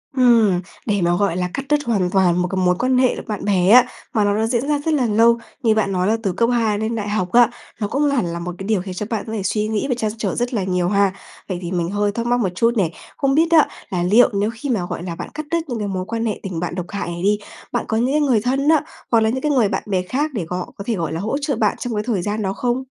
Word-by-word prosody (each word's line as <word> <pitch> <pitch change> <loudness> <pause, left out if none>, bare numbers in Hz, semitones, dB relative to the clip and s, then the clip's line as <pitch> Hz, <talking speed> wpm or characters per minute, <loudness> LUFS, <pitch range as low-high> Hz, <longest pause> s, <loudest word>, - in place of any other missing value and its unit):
Ừm, 230 -8 +4 0.2
để 205 -3 0
mà, 175 0 +2
gọi 185 -2 0
là, 180 0 -1
cắt 275 - -4
đứt 295 -1 +2
hoàn 200 -6 +1
toàn 180 -2 +3
một 180 - 0
cái 190 - -4
mối 180 0 +3
quan 255 0 +2
hệ 255 -1 +2
bạn 210 -3 -4
bè 190 -3 +2
á, 245 +3 +8 0.3
mà 215 -4 +2
nó 205 0 +2
đã 220 - +1
diễn 245 +3 -1
ra 295 -1 +1
rất 320 - +2
là 265 -5 +2
lâu, 230 +2 +4 0.3
như 220 -2 +3
bạn 210 -2 +1
nói 185 0 0
là 225 +2 +2
từ 195 - 0
cấp 230 +6 +1
2 220 -3 +1
lên 220 +1 -2
đại 210 -2 -3
học 185 -4 -1
á, 240 -1 +6 0.3
nó 205 - -1
cũng 275 +7 0
hẳn 275 -8 +1
là 170 0 -4
một 175 +1 -5
cái 195 - -7
điều 210 -5 +1
khiến 185 -1 -6
cho 205 +3 -4
bạn 225 -3 -2
có 220 - -5
thể 205 -4 -3
suy 210 +2 0
nghĩ 220 +4 -1
và 250 - +1
trăn 215 -3 -1
trở 200 -4 -2
rất 245 +1 -2
là 205 - 0
nhiều 180 -1 0
ha. 200 -1 +2 0.4
Vậy 180 - -3
thì 175 - -5
mình 175 -2 -1
hơi 205 +1 0
thắc 230 +2 -3
mắc 245 +1 +2
một 195 -6 +1
chút 230 +3 +2
này, 175 -5 +1 0.3
không 275 -1 +1
biết 330 +1 +3
á, 320 -3 +6 0.2
là 175 -2 -1
liệu 220 +8 +5
nếu 205 +2 +1
khi 260 +6 -6
mà, 210 -8 0
gọi - - -4
là, 170 -2 -5
bạn - - -7
cắt 305 0 -5
đứt 335 - +2
những 235 -3 -3
cái 205 - -2
mối 185 -1 -3
quan 230 +1 -3
hệ 215 - -2
tình 185 -4 -4
bạn 175 0 -3
độc 180 -1 -3
hại 200 - -4
này 170 +1 -5
đi, 205 +1 +3 0.3
bạn - - -1
có 220 - 0
những 250 +4 +1
cái 300 - +2
người 255 -7 +3
thân 270 +4 +1
á, 315 -3 +5 0.3
hoặc 230 - +5
là 220 - +2
những 260 +3 -2
cái 300 - 0
người 245 -7 +3
bạn - - -2
bè 190 -3 0
khác 285 +11 -2
để 200 -9 -3
họ 180 +2 -4
có 200 - -7
thể, 230 - +1
gọi 165 -4 -3
là, 165 - -3
hỗ 220 +9 -1
trợ 285 -3 -1
bạn 215 -2 +1
trong 245 -2 -3
cái 210 - -1
thời 210 -7 0
gian 210 +3 -2
đó 195 -1 -1
không? 245 +3 -1
215 Hz, 315 wpm, -20 LUFS, 185-245 Hz, 0.4 s, á